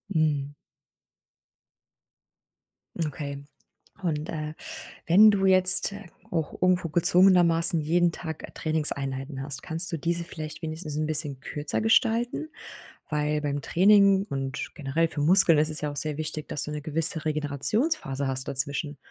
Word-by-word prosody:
Mhm. 145 -2 0 2.5
Okay. 140 -3 -7 0.6
Und, 155 -2 -3
äh, 155 -1 -5 0.5
wenn 210 +5 +7
du 195 -1 0
jetzt 185 +1 +5 0.4
auch 160 -3 -4
irgendwo 180 -2 +1
gezwungenermaßen 175 -1 +5
jeden 170 +3 +1
Tag 160 -2 -8
Trainingseinheiten 140 -3 -2
hast, 140 -1 -5
kannst 165 +3 -2
du 165 - -3
diese 170 +3 -2
vielleicht 155 0 -9
wenigstens 155 -1 -6
'n 155 - -1
bisschen 150 -3 -1
kürzer 145 +5 -4
gestalten? 235 +6 +1 0.6
Weil 150 0 -1
beim 145 -1 -3
Training 195 +3 +4
und 135 +1 -5
generell 155 +2 -1
für 145 - -5
Muskeln 165 0 +6
ist 155 +1 +1
es 155 - -4
ja 150 -1 -3
auch - - -10
sehr 150 0 -2
wichtig, 155 -1 -5
dass 145 - -3
du 150 - -5
'ne 150 0 -5
gewisse 160 +1 -1
Regenerationsphase 150 - -1
hast 130 0 -3
dazwischen. 140 +2 -2
155 Hz, 135 wpm, -25 LUFS, 145-175 Hz, 2.5 s, wenn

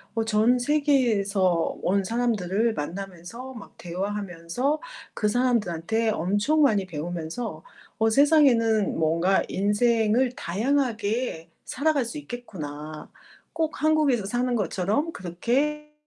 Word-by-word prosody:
어 225 - +1
전 225 +3 +3
세계에서 220 - +1
온 195 +1 +1
사람들을 225 -1 0
만나면서 195 - -6
막 220 -5 -12
대화하면서 195 - -3 0.3
그 210 - 0
사람들한테 225 -3 +1
엄청 205 - +1
많이 210 -8 +3
배우면서 170 +7 -5 0.4
'어 225 0 +3
세상에는 240 -6 +4
뭔가 165 +4 +2
인생을 225 +4 +2
다양하게 225 - -1 0.2
살아갈 285 -2 0
수 235 +6 -6
있겠구나. 155 - -8 0.4
꼭 320 -3 -2
한국에서 300 -8 +3
사는 245 +4 0
것처럼 205 - 0
그렇게 275 - -2
220 Hz, 260 characters per minute, -25 LUFS, 185-255 Hz, 0.4 s, 세상에는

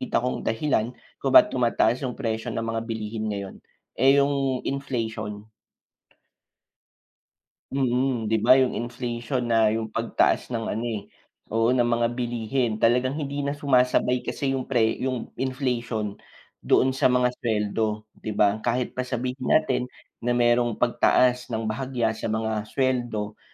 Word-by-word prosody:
kita 255 - 0
kong 125 - -1
dahilan 115 -1 0 0.3
kung 135 - 0
ba't - - +8
tumataas 120 -1 +2
yung 125 -2 -3
presyo 110 -3 -2
ng 115 - -3
mga 115 0 -2
bilihin 110 0 -4
ngayon, 100 -2 -5 0.4
eh, 135 +3 +4
yung 140 -2 +1
inflation. 110 -6 -3 2.3
Mm, 125 -3 0
'di 110 - +2
ba 130 - +7
yung 130 - +1
inflation 120 +1 -3
na 115 -2 +3
yung 110 0 -2
pagtaas 115 +2 0
ng 115 -2 -2
ano, 115 - -3
eh, 110 -4 -4 0.5
oo 115 +2 +3
ng 120 -2 +2
mga 120 0 +2
bilihin 120 -1 -1
talagang 125 +5 +2
hindi 145 -2 -4
na 140 0 -2
sumasabay 125 -2 +2
kasi 135 -1 -1
yung 130 -1 -2
pre 115 -4 +1
yung 130 -3 -3
inflation 120 -6 -2 0.4
doon 130 +1 +3
sa 130 - +2
mga 125 0 +2
sweldo, 105 -1 -1
'di 105 -1 -7
ba? 105 +1 +3
Kahit 120 +2 -1
pa 125 0 -4
sabihin 125 +1 -3
natin 130 -5 +2 0.3
na 120 +1 0
merong 120 -1 +2
pagtaas 125 +1 +2
ng 115 -2 -3
bahagya 120 +1 -1
sa 110 +1 -5
mga 110 -1 -2
sweldo 120 -5 -1
120 Hz, 145 wpm, -25 LUFS, 110-130 Hz, 2.3 s, ba't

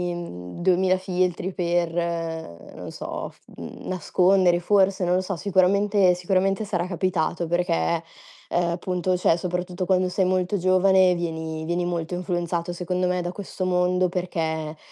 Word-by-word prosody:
mhmm, 90 - -8
2000 185 +1 +3
filtri 185 0 -1
per 170 -1 0 0.8
non - - -8
so, - - -5
f - - -23 0.2
mhmm, - - -9
nascondere 185 -1 +3
forse, 195 0 +2
non 180 0 +2
lo 185 - +2
so. 185 0 -3
Sicuramente 195 0 +3
sicuramente 190 +3 0
sarà 180 -4 -2
capitato 175 -2 -1
perché, 170 -1 0 0.5
uhm, 170 -1 +1
punto, 180 0 -1
cioè 165 - +3
soprattutto 180 +1 -3
quando 185 0 +2
sei 185 +1 0
molto 185 +1 +1
giovane, 185 0 +4
vieni 160 -2 -4
vieni 175 +1 -1
molto 175 0 -3
influenzato, 175 -1 -2
secondo 180 +1 -2
me, 180 0 0
da 175 +1 -4
questo 190 -1 -5
mondo, 180 0 +2
perché 160 -3 -3
180 Hz, 145 wpm, -24 LUFS, 175-185 Hz, 0.8 s, giovane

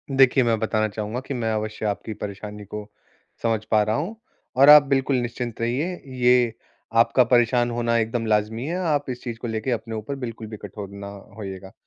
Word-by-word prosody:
देखिए, 135 0 +5
मैं 115 -1 +2
बताना 110 0 +1
चाहूँगा 105 +3 -4
कि 135 +2 -6
मैं 115 -3 -1
अवश्य 110 0 -3
आपकी 105 +1 -2
परेशानी 105 +1 -7
को 105 +1 -7 0.5
समझ 115 -2 +1
पा 110 -1 +5
रहा 110 +1 0
हूँ 175 - -3 0.4
और 140 +2 +8
आप 150 0 +11
बिल्कुल 135 -1 +1
निश्चिंत 120 -1 -4
रहिए, 135 +10 -1
ये 125 -2 +3 0.4
आपका 120 +2 +5
परेशान 120 0 +3
होना 115 0 0
एकदम 115 +1 -1
लाज़मी 110 +2 0
है, 170 +4 -2
आप 150 -6 0
इस 125 -1 -5
चीज़ 120 -3 -5
को 120 - -4
लेके 110 +3 -2
अपने 115 -1 -3
ऊपर 110 +6 -4
बिल्कुल 115 -4 -6
भी 110 0 -8
कठोर 105 -1 -8
न 100 0 -8 0.3
होइएगा। 95 -2 -7
115 Hz, 190 wpm, -24 LUFS, 110-125 Hz, 0.5 s, आप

